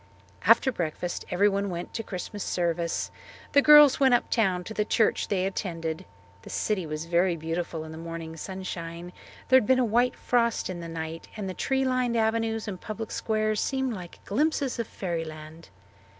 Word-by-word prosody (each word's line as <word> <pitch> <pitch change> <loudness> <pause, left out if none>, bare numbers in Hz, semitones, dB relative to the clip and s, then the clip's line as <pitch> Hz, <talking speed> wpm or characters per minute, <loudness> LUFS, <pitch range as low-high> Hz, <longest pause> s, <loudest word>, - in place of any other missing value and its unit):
After 265 - +6
breakfast 175 -3 -3
everyone 200 +2 +2
went 175 -1 -5
to 225 - -2
Christmas 200 0 -6
service. 170 -1 -1 0.4
The 285 - +6
girls 295 -1 +8
went 265 -3 +6
uptown 190 -7 +1
to 220 - -7
the 210 - +1
church 220 +1 +1
they 190 -2 0
attended. 165 -4 -3 0.4
The - - -12
city 190 -6 -1
was 155 +1 -4
very 175 +1 +2
beautiful 165 0 -3
in 160 - -9
the 160 - -8
morning 165 -1 -6
sunshine. 175 -1 -6 0.4
There 260 - +8
had 235 -5 +2
been 260 - +5
a 255 - +3
white 240 +3 +2
frost 235 -5 +1
in 175 - -6
the 170 -1 -7
night 165 0 -6
and 205 -2 -4
the 185 - -3
tree 265 +7 0
lined 255 -2 +1
avenues 225 0 0
and 185 -3 -5
public 220 0 -6
squares 215 -1 0
seemed 265 -2 -1
like 180 -4 -10
glimpses 280 +2 0
of 230 - -2
fairyland. 165 -2 -6
190 Hz, 175 wpm, -27 LUFS, 170-230 Hz, 0.4 s, girls